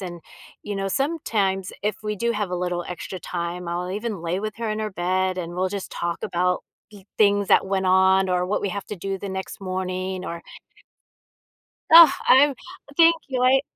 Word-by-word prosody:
And, 175 Hz, -3 st, -7 dB, 0.4 s
you 205 Hz, -1 st, -5 dB
know, 195 Hz, 0 st, -2 dB
sometimes 200 Hz, -, -1 dB
if 210 Hz, 0 st, -1 dB
we 210 Hz, 0 st, -1 dB
do 235 Hz, +4 st, -1 dB
have 210 Hz, -4 st, -2 dB
a -, -, -2 dB
little 180 Hz, -1 st, -2 dB
extra 180 Hz, +1 st, -6 dB
time, 175 Hz, +1 st, -5 dB
I'll 175 Hz, +1 st, -3 dB
even 210 Hz, -2 st, -4 dB
lay 170 Hz, +2 st, -1 dB
with 215 Hz, +1 st, -4 dB
her 230 Hz, -2 st, -2 dB
in 215 Hz, -, -2 dB
her 215 Hz, -1 st, -3 dB
bed, 185 Hz, +1 st, -1 dB
and 175 Hz, -1 st, -5 dB
we'll 185 Hz, +1 st, 0 dB
just 200 Hz, 0 st, -6 dB
talk 170 Hz, 0 st, -3 dB
about 180 Hz, +1 st, 0 dB, 0.3 s
thi 205 Hz, -3 st, -15 dB
things 205 Hz, -1 st, +3 dB
that -, -, +4 dB
went 190 Hz, 0 st, -1 dB
on 190 Hz, +1 st, +4 dB
or 180 Hz, 0 st, 0 dB
what 200 Hz, -, -1 dB
we 200 Hz, -, 0 dB
have 200 Hz, +1 st, -5 dB
to 210 Hz, -, -6 dB
do 195 Hz, +2 st, -4 dB
the 200 Hz, -, -6 dB
next 190 Hz, +1 st, -6 dB
morning, 185 Hz, 0 st, -3 dB
or 170 Hz, -2 st, -5 dB, 1.5 s
Ugh, 330 Hz, -2 st, +11 dB, 0.2 s
I'm 285 Hz, +2 st, +6 dB, 0.4 s
thank 335 Hz, 0 st, +7 dB
you, 260 Hz, -2 st, -2 dB
I 260 Hz, +1 st, +5 dB
190 Hz, 195 wpm, -23 LUFS, 180-210 Hz, 1.5 s, Ugh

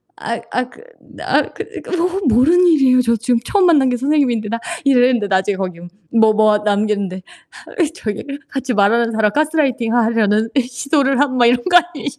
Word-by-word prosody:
아이 -, -, -5 dB
아이 255 Hz, -, -1 dB
그 445 Hz, -, -17 dB, 0.3 s
나 -, -, 0 dB
그 -, -, -7 dB, 0.2 s
그거 360 Hz, +2 st, -2 dB
모르는 320 Hz, +10 st, +3 dB
일이에요. 265 Hz, -6 st, +4 dB
저 235 Hz, -1 st, +1 dB
지금 235 Hz, +1 st, 0 dB
처음 390 Hz, -, +1 dB
만난 290 Hz, -7 st, +3 dB
게 245 Hz, -, -1 dB
선생님인데 260 Hz, -5 st, 0 dB
나 230 Hz, 0 st, -3 dB, 0.2 s
이랬는데 250 Hz, -5 st, +2 dB
나중에 190 Hz, 0 st, 0 dB
거기 185 Hz, -3 st, -5 dB, 0.4 s
뭐 220 Hz, -1 st, +4 dB
뭐 215 Hz, -1 st, +3 dB
남겼는데 205 Hz, -3 st, -2 dB, 0.7 s
저기를 275 Hz, -, -6 dB
"같이 270 Hz, -2 st, -4 dB
말하는 230 Hz, +2 st, +1 dB
사람 220 Hz, -1 st, +1 dB
가스라이팅 290 Hz, -7 st, 0 dB
하려는 225 Hz, -2 st, +1 dB
이 270 Hz, -, +2 dB
시도를 275 Hz, +2 st, -1 dB
함." 270 Hz, -3 st, 0 dB
막 245 Hz, -, +3 dB
이런 240 Hz, +1 st, +3 dB
거 355 Hz, -1 st, +3 dB
아니시 310 Hz, -5 st, -1 dB
245 Hz, 370 characters per minute, -17 LUFS, 215-285 Hz, 0.7 s, 일이에요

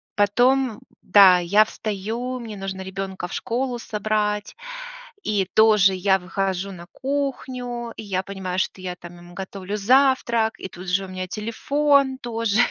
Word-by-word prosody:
потом, 245 Hz, +3 st, +2 dB, 0.2 s
да, 190 Hz, -3 st, +7 dB
я 200 Hz, +5 st, +4 dB
встаю, 225 Hz, +5 st, -4 dB
мне 220 Hz, -3 st, -7 dB
нужно 195 Hz, -1 st, -5 dB
ребенка 190 Hz, -1 st, -5 dB
в -, -, -10 dB
школу 250 Hz, +1 st, -2 dB
собрать, 210 Hz, -, -1 dB, 0.7 s
и 205 Hz, -2 st, +1 dB
тоже 210 Hz, -3 st, +6 dB
я 190 Hz, +1 st, +3 dB
выхожу 190 Hz, +1 st, -2 dB
на 175 Hz, -2 st, -10 dB
кухню, 255 Hz, -4 st, -3 dB
и -, -, -6 dB
я 190 Hz, -2 st, -2 dB
понимаю, 190 Hz, -1 st, -4 dB
что 190 Hz, -, -2 dB
я 180 Hz, -1 st, -4 dB
там 175 Hz, 0 st, -12 dB
ему 175 Hz, 0 st, -14 dB
готовлю 195 Hz, +1 st, -5 dB
завтрак, 235 Hz, -1 st, +3 dB
и -, -, -5 dB
тут 180 Hz, +1 st, -10 dB
же 195 Hz, +1 st, +1 dB
у -, -, -11 dB
меня 185 Hz, 0 st, -5 dB
телефон 270 Hz, +6 st, +1 dB
тоже. 230 Hz, -4 st, -1 dB
205 Hz, 150 wpm, -23 LUFS, 190-240 Hz, 0.7 s, да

